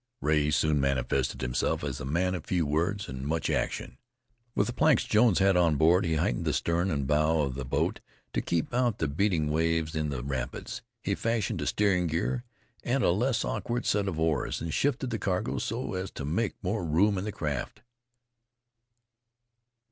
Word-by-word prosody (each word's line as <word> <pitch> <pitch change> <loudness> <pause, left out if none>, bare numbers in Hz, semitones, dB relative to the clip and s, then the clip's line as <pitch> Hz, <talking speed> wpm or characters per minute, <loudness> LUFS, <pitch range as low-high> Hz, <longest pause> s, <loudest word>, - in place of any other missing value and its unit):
Rea 75 -1 +2
soon 75 -1 +2
manifested 65 -1 0
himself 65 +1 0
as - - -3
a - - -5
man 90 +6 0
of 85 -4 -5
few 90 -4 +1
words 85 +8 0
and 65 0 -6
much 80 +2 -1
action. 65 - -2 0.6
With - - +3
the 120 - -3
planks 155 -1 +4
Jones 110 -1 +4
had 95 -1 +4
on 85 -3 +4
board 85 +6 +4
he 80 -1 +1
heightened - - 0
the - - +1
stern 85 +3 +1
and 70 -5 -1
bow 75 +2 +2
of 70 -3 -1
the 65 0 -5
boat - - 0 0.3
to - - 0
keep 85 +6 -1
out 120 -3 +1
the 80 - 0
beating 80 0 +1
waves 80 0 0
in 75 -1 -1
the 65 -4 -4
rapids; 65 -3 -4 0.2
he - - 0
fashioned 115 -3 -1
a - - -2
steering 95 -4 +2
gear 90 +10 -1 0.4
and 125 +1 +1
a - - +4
less 115 +5 +1
awkward 120 +1 -2
set 100 -1 +1
of 85 -5 -2
oars, 80 -4 0
and 80 -1 -4
shifted 135 -2 0
the 115 - -2
cargo 95 -2 -1
so - - -3
as 95 +1 -3
to 70 - -6
make 95 +9 -1
more 100 +2 -1
room 90 +6 +3
in - - -4
the 105 - -3
craft. 75 -7 -4
85 Hz, 190 wpm, -28 LUFS, 75-100 Hz, 0.6 s, planks